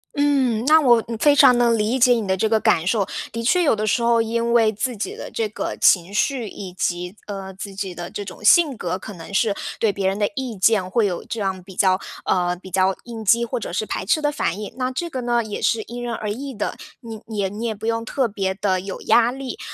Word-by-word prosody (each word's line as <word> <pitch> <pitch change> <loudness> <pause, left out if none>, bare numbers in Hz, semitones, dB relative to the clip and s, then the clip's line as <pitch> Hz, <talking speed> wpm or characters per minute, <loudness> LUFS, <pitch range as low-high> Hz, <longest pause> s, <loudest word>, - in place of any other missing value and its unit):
嗯， 265 -5 +1
那 315 +2 +6
我 240 -4 +5
嗯， 230 - -4
非 290 +2 +5
常 250 -3 +7
能 235 -1 +3
理 225 +5 0
解 245 +1 +6
你 225 -4 -1
的 190 - +2
这 215 +3 0
个 220 -1 +3
感 165 -4 +2
受， 205 -1 +2 0.3
的 230 0 -4
确 360 +9 +3
有 305 -9 +3
的 215 0 -2
时 225 +3 +1
候 235 -1 +3
因 235 +1 -1
为 225 -2 +4
自 235 +3 -3
己 205 - -4
的 - - -8
这 225 - -1
个 - - -4
情 180 0 +4
绪， 240 +2 0
以 190 -2 -8
及， 180 +1 -2
呃， 195 -2 -6
自 195 +1 -8
己 190 -2 -4
的 175 0 -7
这 205 - -6
种 195 +2 -10
性 300 +4 +5
格， 180 -4 -3
可 205 +3 -9
能 170 +1 -11
是 200 +1 +1 0.2
对 215 -3 +2
别 195 -1 -1
人 195 +1 0
的 205 -1 +1
意 255 -5 -4
见 190 -1 +2
会 225 +3 +2
有 180 -3 -2
这 230 - -5
样 190 -2 -2
比 190 0 -13
较， 185 0 +3 0.3
呃， 180 -1 +1
比 185 +1 -13
较 190 +1 +2
应 230 -2 -8
激 235 +3 +3
或 235 +1 -3
者 195 - -6
是 205 +4 -1
排 - - -3
斥 230 +11 +2
的 295 -1 0
反 200 - -2
应。 210 - -7
那 255 -1 -1
这 300 +7 -3
个 255 - -3
呢， 240 -1 +1
也 210 -1 -6
是 225 -2 +1
因 240 +2 -7
人 240 - -3
而 210 -1 -4
异 270 +3 -6
的， 205 - -3 0.3
你 225 -3 -8
你 220 -2 -6
也 195 -2 0
你 215 +4 -5
也 220 - -2
不 210 - -8
用 230 0 0
特 255 +1 0
别 195 -3 -2
地 190 -1 0
有 190 0 -6
压 235 +2 +4
力。 265 -1 -6
220 Hz, 280 characters per minute, -22 LUFS, 195-240 Hz, 0.3 s, 常